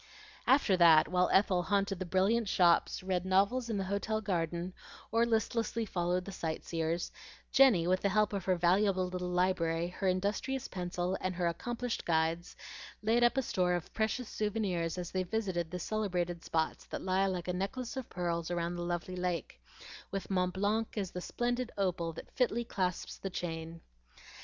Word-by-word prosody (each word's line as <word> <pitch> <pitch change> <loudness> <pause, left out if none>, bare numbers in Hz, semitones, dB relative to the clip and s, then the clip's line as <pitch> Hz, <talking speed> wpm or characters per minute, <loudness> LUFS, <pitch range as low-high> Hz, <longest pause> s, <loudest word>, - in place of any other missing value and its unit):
After 265 -8 +5
that, 165 -3 +7
while 180 0 +2
Ethel 190 -2 +4
haunted 195 0 0
the 185 - -4
brilliant 200 +5 +2
shops, 175 -1 +3
read 185 -1 0
novels 200 +7 +2
in 220 - -1
the 195 - 0
hotel 200 +3 -1
garden, 175 -3 -2 0.4
or 230 +1 +3
listlessly 225 0 0
followed 180 -2 -1
the 195 - -6
sight 165 -4 -4
seers, 165 +1 -2 0.4
Jenny, 245 -11 +6
with 185 +1 +2
the 200 - +2
help 210 +1 +2
of 195 -3 -3
her 185 - +3
valuable 185 +2 +3
little 180 0 -3
library, 175 -2 +1
her 190 +2 -3
industrious 205 +8 -1
pencil, 180 0 -2
and 185 -1 -2
her 175 0 -1
accomplished 240 +8 -2
guides, 165 +1 0 0.5
laid 230 +3 +3
up 240 +2 +4
a 265 - +2
store 180 -5 +1
of 175 - -5
precious 220 +2 -1
souvenirs 195 -7 -1
as 175 -1 -4
they 185 - 0
visited 185 -3 -2
the 180 - -4
celebrated 180 -4 -2
spots 160 -1 -1
that - - -6
lie 190 +1 +2
like 180 -3 -3
a 180 - 0
necklace 235 +8 -3
of 265 -2 -5
pearls 170 -2 -2
around 175 0 -1
the - - -4
lovely 175 +1 -3
lake, 180 - -3 0.5
with 195 0 -4
Mont 180 -1 +1
Blanc 215 +4 0
as 195 -3 -2
the 180 - -5
splendid 245 +4 -2
opal 180 -4 0
that - - -10
fitly 240 -2 +1
clasps 185 -5 -2
the 195 - -4
chain. 165 -2 -5
185 Hz, 175 wpm, -32 LUFS, 175-210 Hz, 0.5 s, that